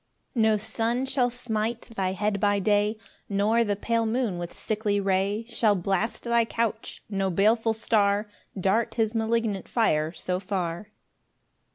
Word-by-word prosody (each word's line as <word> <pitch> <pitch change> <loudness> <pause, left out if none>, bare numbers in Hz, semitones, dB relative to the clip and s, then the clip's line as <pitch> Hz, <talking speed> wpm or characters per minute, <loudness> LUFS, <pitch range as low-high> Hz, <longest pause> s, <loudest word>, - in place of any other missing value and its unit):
5 - - -42
No 220 -1 +4
sun 230 +4 -1
shall 260 -2 +1
smite 230 -1 -2
thy 190 -2 0
head 205 +1 -1
by 205 0 +2
day, 205 +2 +2 0.3
Nor 210 +4 +2
the 205 -2 0
pale 230 +2 0
moon 220 -6 -1
with 175 0 -5
sickly 210 -2 -1
ray 200 +3 0
Shall 225 -3 +2
blast 195 +4 -1
thy 235 -1 +3
couch; 225 0 -3
no 195 -2 -1
baleful 220 +5 +2
star 210 -2 +2 0.3
Dart 195 +5 +1
his 220 -1 +1
malignant 225 -3 0
fire 155 -9 +1
so 180 +2 -3
far. 185 0 -3
215 Hz, 150 wpm, -26 LUFS, 195-230 Hz, 0.3 s, No